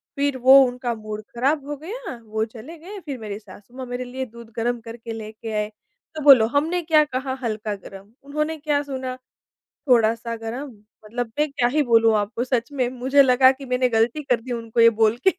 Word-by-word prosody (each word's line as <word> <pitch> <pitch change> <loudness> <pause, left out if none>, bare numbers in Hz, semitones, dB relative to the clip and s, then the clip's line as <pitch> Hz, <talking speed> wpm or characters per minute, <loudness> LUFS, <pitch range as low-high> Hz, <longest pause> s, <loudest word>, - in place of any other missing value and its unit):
फिर 280 -2 0
वो 260 +2 +8
उनका 245 -1 -3
मूड 215 -1 -6
ख़राब 275 +4 +1
हो 295 - -3
गया, 405 - -6
वो 220 0 -1
चले 250 +9 -11
गए 390 +6 -9
फिर 275 -3 -5
मेरी 210 -2 -6
सासू 205 +3 -16
माँ 260 - -5
मेरे 245 +1 -4
लिए 260 +1 -5
दूध 235 -1 -13
गरम 240 +1 -1
करके 230 0 -8
लेके 220 0 -7
आए, 210 0 -1 0.5
तो 310 - -4
बोलो, 265 -6 +8
हमने 315 +8 0
क्या 310 -1 +5
कहा 260 -1 -3
हल्का 215 -2 -2
गरम? 195 +1 -13
उन्होंने 305 +3 -2
क्या 295 -1 0
सुना? 260 -2 -5 0.7
थोड़ा-सा 230 -1 +3
गरम 240 +6 -6 0.4
मतलब 230 +1 -4
मैं 300 0 +2
क्या 240 -3 +1
ही 300 +3 +2
बोलूँ 225 -3 +4
आपको 210 +4 -2
सच 250 +1 -1
में 255 -3 0
मुझे 260 +3 +3
लगा 260 0 +6
कि 270 +1 -9
मैंने 250 0 +1
ग़लती 235 +6 +1
कर 245 -4 +1
दी 250 +2 -8
उनको 230 -1 -3
ये 230 - +9
बोल 220 +2 +4
के। 380 - +8
245 Hz, 205 wpm, -23 LUFS, 225-280 Hz, 0.7 s, ये